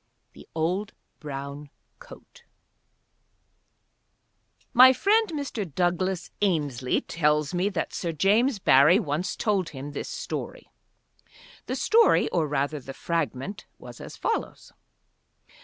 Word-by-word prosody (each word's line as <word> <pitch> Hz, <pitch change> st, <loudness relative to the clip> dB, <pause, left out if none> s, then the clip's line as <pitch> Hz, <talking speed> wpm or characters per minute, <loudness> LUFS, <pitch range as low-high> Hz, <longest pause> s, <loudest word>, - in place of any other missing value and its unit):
THE -, -, -15 dB
OLD 180 Hz, +6 st, -1 dB, 0.3 s
BROWN 140 Hz, 0 st, -7 dB, 0.3 s
COAT 480 Hz, -1 st, -15 dB, 2.3 s
My 255 Hz, +2 st, +8 dB
friend, 430 Hz, -, +2 dB
Mr. 275 Hz, -, -4 dB
Douglas 180 Hz, +3 st, -1 dB
Ainslie, 145 Hz, -10 st, 0 dB
tells 150 Hz, -1 st, 0 dB
me 180 Hz, +3 st, +1 dB
that 190 Hz, -, -3 dB
Sir 170 Hz, -, -3 dB
James 210 Hz, -, +2 dB
Barrie 150 Hz, -1 st, +5 dB
once 170 Hz, -1 st, -2 dB
told 195 Hz, -5 st, 0 dB
him 140 Hz, +1 st, -8 dB
this -, -, -6 dB
story. -, -, -6 dB, 1.0 s
The -, -, -2 dB
story, 460 Hz, +1 st, +4 dB
or 165 Hz, -3 st, 0 dB
rather 145 Hz, +1 st, -1 dB
the 135 Hz, 0 st, -10 dB
fragment, 165 Hz, -, -3 dB
was -, -, -12 dB
as -, -, -10 dB
follows. 455 Hz, -, -3 dB
175 Hz, 110 wpm, -26 LUFS, 145-205 Hz, 2.3 s, My